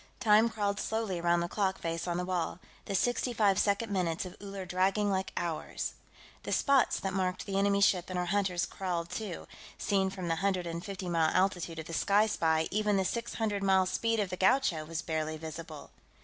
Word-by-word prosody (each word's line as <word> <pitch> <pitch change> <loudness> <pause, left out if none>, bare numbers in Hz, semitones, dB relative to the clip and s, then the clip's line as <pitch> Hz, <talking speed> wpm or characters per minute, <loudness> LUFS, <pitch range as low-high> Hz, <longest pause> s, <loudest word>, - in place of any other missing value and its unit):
Time 220 -1 +5
crawled 205 -2 -1
slowly 220 -5 -2
around 170 0 +2
the 170 - -1
clock 190 0 0
face 165 +1 -3
on 175 -1 -1
the 180 - -1
wall, 180 -3 -1 0.3
the 200 - -2
sixty 245 +4 +1
five 205 -4 +3
second 205 +2 +1
minutes 175 -2 0
of 185 +1 -8
Uller 195 -2 -6
dragging 190 +3 +1
like 190 0 -1
hours. 165 -2 -3 0.5
The - - -6
spots 275 -3 +3
that 195 -1 -3
marked 185 -1 -1
the 195 -1 -1
enemy 200 0 +2
ship 185 -3 +3
and 185 - -3
her 180 - 0
hunters 180 -2 +1
crawled, 175 -3 -3
too; 195 -2 -5 0.3
seen 195 -1 +1
from 185 -2 -5
the 165 -1 0
hundred 190 -1 0
and 170 0 -4
fifty 190 -2 -6
mile 165 -2 +2
altitude 180 -3 +1
of 160 - -5
the 165 - -7
Sky 205 +5 +3
Spy, 160 -6 +1
even 210 -1 +2
the 190 - +1
six 235 +4 -3
hundred 210 -3 -1
mile 190 -1 +4
speed 225 +4 0
of 200 -3 -1
the 180 - -3
Gaucho 190 - +2
was 165 +2 -4
barely 155 -1 -2
visible. 160 -1 -8
190 Hz, 205 wpm, -31 LUFS, 170-205 Hz, 0.5 s, Time